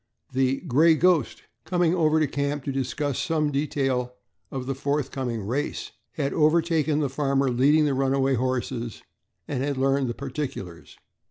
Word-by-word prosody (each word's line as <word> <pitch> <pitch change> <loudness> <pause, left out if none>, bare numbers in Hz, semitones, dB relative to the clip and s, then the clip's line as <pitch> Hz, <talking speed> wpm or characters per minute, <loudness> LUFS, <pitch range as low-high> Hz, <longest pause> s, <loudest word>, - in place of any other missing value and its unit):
The 130 +1 +1
"Gray 160 +1 +4
Ghost," 170 -4 +2 0.2
coming 175 +1 +1
over 160 -3 +3
to 155 - +3
the - - -7
camp 140 0 -1
to 140 - -2
discuss 135 +1 -2
some 155 -3 0
detail 135 -4 -1 0.3
of 130 -2 -5
the 135 - -2
forthcoming 135 -4 -2
race, 130 +7 -3 0.2
had 140 -3 -2
overtaken 155 -1 +2
the 145 - +1
farmer 135 -1 0
leading 145 +5 +4
the 145 - +1
runaway 135 0 +1
horses 125 -2 -2 0.4
and 135 -3 -2
had 140 -1 -1
learned 135 -1 +1
the 120 - -3
particulars. 130 - -6
140 Hz, 155 wpm, -25 LUFS, 130-150 Hz, 0.4 s, Gray